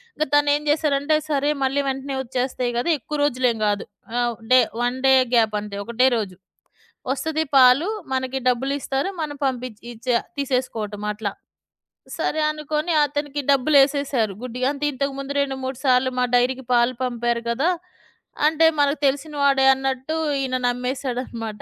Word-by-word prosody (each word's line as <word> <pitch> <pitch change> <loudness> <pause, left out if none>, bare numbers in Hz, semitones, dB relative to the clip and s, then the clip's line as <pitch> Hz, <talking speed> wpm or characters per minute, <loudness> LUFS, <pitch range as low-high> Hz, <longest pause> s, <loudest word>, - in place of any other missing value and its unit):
ఇంక 310 - 0
తనేం 290 0 +3
జేసారంటే, 295 0 +2
సరే. 290 -1 +1
మళ్ళీ 270 +2 +1
వెంటనే 270 +1 -4
ఒచ్చేస్తాయి 250 0 -2
గదా! 245 +8 0
ఎక్కువ 300 +5 -5
రోజులేం 250 -4 +1
గాదు. 205 -1 0 0.3
ఆహ్, 240 -1 0 0.2
డే 255 - +8 0.2
వన్ 245 +1 0
డే 265 - +6 0.2
గ్యాపంతే. 210 -3 +1
ఒకటే 235 +3 +2
రోజు. 200 -5 -4 0.8
ఒస్తది 320 +2 -2
పాలు, 260 +6 +6 0.3
మనకి 260 0 -1
డబ్బులిస్తారు. 270 +4 -1
మనం 295 -2 -4
పంపిచ్చి 250 -4 -4
ఇచ్చా 240 +1 0 0.2
తీసేసుకోవటం 250 -6 -2
అట్లా. 210 -1 -4 0.9
సరే! 315 - -1
అనుకోని 305 +2 -2
అతనికి 290 0 -3
డబ్బులేసేసారు 275 -5 +3
గుడ్డిగా. 255 +1 -2
అంటే 295 +1 -3
ఇంతకుముందు 275 +1 -3
రెండు, 275 -1 -2
మూడు 260 -1 -4
సార్లు 255 0 +4
మా 250 - +3
డైరీకి 250 +1 +1
పాలు 240 +1 +3
పంపారు 240 -1 -1
కదా! 275 +9 +1 0.8
అంటే 320 +1 +3
మనకు 285 +1 +2
తెలిసిన 285 +3 0
వాడే 275 -1 +4
అన్నట్టు 265 +3 -3 0.3
ఈయన 255 -1 -1
నమ్మేసాడనమాట. 245 -3 -3
265 Hz, 135 wpm, -22 LUFS, 245-285 Hz, 0.9 s, డే